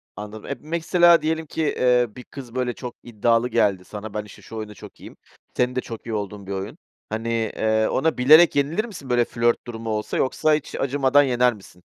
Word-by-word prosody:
Anladım. 105 Hz, +1 st, -8 dB
E, 140 Hz, -, -4 dB
mesela, 170 Hz, +1 st, +4 dB
diyelim 160 Hz, +1 st, -1 dB
ki, 160 Hz, -, -4 dB
eee, 125 Hz, -4 st, +2 dB
bir 125 Hz, -, -9 dB
kız, 130 Hz, -3 st, -11 dB
böyle, 125 Hz, -1 st, -1 dB
çok 125 Hz, -2 st, -8 dB
iddialı 115 Hz, +1 st, +1 dB
geldi 95 Hz, -5 st, +1 dB
sana, 105 Hz, 0 st, -8 dB
“Ben, 105 Hz, -1 st, -4 dB
işte, 105 Hz, -, -14 dB
şu 115 Hz, -, -11 dB
oyunda 105 Hz, -1 st, -6 dB
çok -, -, -13 dB
iyiyim.” -, -, -12 dB, 0.4 s
Senin 125 Hz, 0 st, +1 dB
de 130 Hz, -, 0 dB
çok 115 Hz, -2 st, -9 dB
iyi 115 Hz, -, -5 dB
olduğun 100 Hz, -1 st, -5 dB
bir -, -, -6 dB
oyun. 95 Hz, 0 st, -5 dB, 0.3 s
Hani, 110 Hz, +2 st, -3 dB, 0.3 s
eee, 110 Hz, 0 st, +1 dB
ona 160 Hz, +2 st, 0 dB
bilerek 155 Hz, +7 st, +7 dB
yenilir 155 Hz, +10 st, +1 dB
misin, 165 Hz, -, -10 dB
böyle, 120 Hz, -1 st, +3 dB
flört 120 Hz, 0 st, 0 dB
durumu 115 Hz, -1 st, -6 dB
olsa 105 Hz, -1 st, -2 dB
yoksa 155 Hz, +4 st, +1 dB
hiç 150 Hz, -, -2 dB
acımadan 140 Hz, +1 st, +3 dB
yener 125 Hz, -2 st, +2 dB
misin? 95 Hz, -3 st, -16 dB
120 Hz, 205 wpm, -23 LUFS, 110-140 Hz, 0.4 s, bilerek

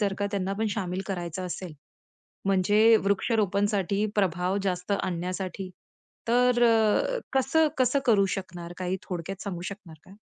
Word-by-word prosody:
जर 200 Hz, -2 st, +1 dB
का 205 Hz, -, 0 dB
त्यांना 195 Hz, -2 st, -1 dB
पण 220 Hz, -, +1 dB
शामिल 190 Hz, -2 st, -2 dB
करायचं 180 Hz, -1 st, -4 dB
असेल, 180 Hz, -1 st, -6 dB, 0.7 s
म्हणजे 205 Hz, +4 st, +5 dB
वृक्षारोपणसाठी 200 Hz, -1 st, +1 dB
प्रभाव 185 Hz, -1 st, +1 dB
जास्त 180 Hz, 0 st, -2 dB
आणण्यासाठी, 185 Hz, +2 st, -4 dB, 0.6 s
तर 245 Hz, +1 st, +4 dB
अ, 230 Hz, -, +3 dB
कसं 270 Hz, +4 st, +3 dB
कसं 255 Hz, +2 st, +3 dB
करू 210 Hz, -5 st, +4 dB
शकणार? 175 Hz, -2 st, -7 dB
काही 185 Hz, 0 st, -2 dB
थोडक्यात 180 Hz, +1 st, -5 dB
सांगू 185 Hz, -4 st, -5 dB
शकणार 190 Hz, -5 st, -11 dB
का? 190 Hz, -, -15 dB
195 Hz, 135 wpm, -27 LUFS, 180-220 Hz, 0.7 s, म्हणजे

